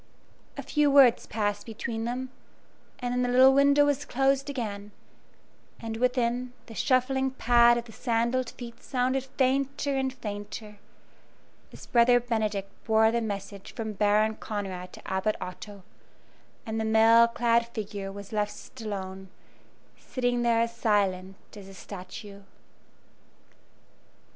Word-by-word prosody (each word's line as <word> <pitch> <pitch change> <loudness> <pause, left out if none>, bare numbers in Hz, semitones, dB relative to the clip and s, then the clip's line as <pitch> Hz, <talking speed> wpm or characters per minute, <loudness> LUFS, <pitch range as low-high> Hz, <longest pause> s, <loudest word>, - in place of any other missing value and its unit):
A - - -5
few 295 -1 +2
words 275 -4 +5
passed 205 -2 -2
between 225 0 -4
them, 255 +2 -4 0.7
and 245 -2 -3
then 250 - 0
the 245 - 0
little 260 +2 +6
window 280 +1 +5
was 290 0 0
closed 270 +2 +1
again; 210 -7 -5 0.9
and 225 -1 -5
within, 250 0 0
the 230 - -11
shuffling 265 +3 +1
pat 240 -2 +4
of 235 - -4
the 230 - -13
sandalled 235 +2 0
feet 235 -2 -10
sounded 260 0 -1
fainter 275 +1 +1
and 265 -1 0
fainter, 210 -3 -7 0.9
as - - -12
Brother 245 0 +4
Benedict 215 -5 -2
bore 220 0 +4
the 235 0 0
message 200 -2 -6
from 220 -1 -4
Baron 210 +2 +2
Conrad 190 -4 -5
to - - -12
Abbot 190 +3 0
Otto, 190 +2 -8 0.8
and 220 0 -3
the - - -1
mail 225 +1 +6
clad 235 0 +1
figure 205 -4 -6
was 200 +1 -10
left 210 +4 -4
alone, 190 -3 -6 0.7
sitting 245 -1 -1
there 235 -1 +3
as 230 0 -2
silent 195 -4 0 0.2
as 200 -2 -11
a 195 - -12
statue. 200 +2 -9
230 Hz, 135 wpm, -27 LUFS, 205-250 Hz, 0.9 s, little